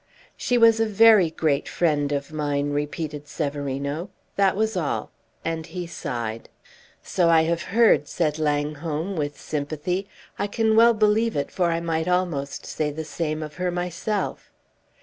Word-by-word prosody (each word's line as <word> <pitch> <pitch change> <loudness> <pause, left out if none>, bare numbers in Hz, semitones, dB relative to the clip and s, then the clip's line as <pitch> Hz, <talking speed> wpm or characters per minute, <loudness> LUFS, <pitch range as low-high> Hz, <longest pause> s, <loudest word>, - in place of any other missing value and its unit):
"She 245 - 0
was 230 -1 +6
a 225 - +2
very 215 -4 +6
great 155 -3 0
friend 150 -4 +1
of 140 +1 -2
mine," 145 -1 -1
repeated 150 0 -3
Severino. 140 +3 -3 0.3
"That 195 -1 +3
was 220 +1 0
all." 165 -6 -2 0.3
And 165 -1 -2
he 180 -1 -5
sighed. 115 -8 -5 0.5
"So 175 -2 +2
I 165 -1 +5
have 170 +1 0
heard," 220 -7 +4
said 155 -2 -1
Langholm, 150 +4 -1
with 145 -2 -3
sympathy. 155 +6 -3 0.3
"I - - 0
can 220 +1 +1
well 230 +1 +6
believe 215 +2 +2
it, 140 - -2
for 180 -2 +1
I 165 0 0
might 165 0 -1
almost 175 -6 -1
say 155 -1 -2
the 155 +2 -5
same 155 0 -3
of 150 -1 -9
her 180 0 0
myself." 180 +4 -3
160 Hz, 155 wpm, -24 LUFS, 145-190 Hz, 0.5 s, was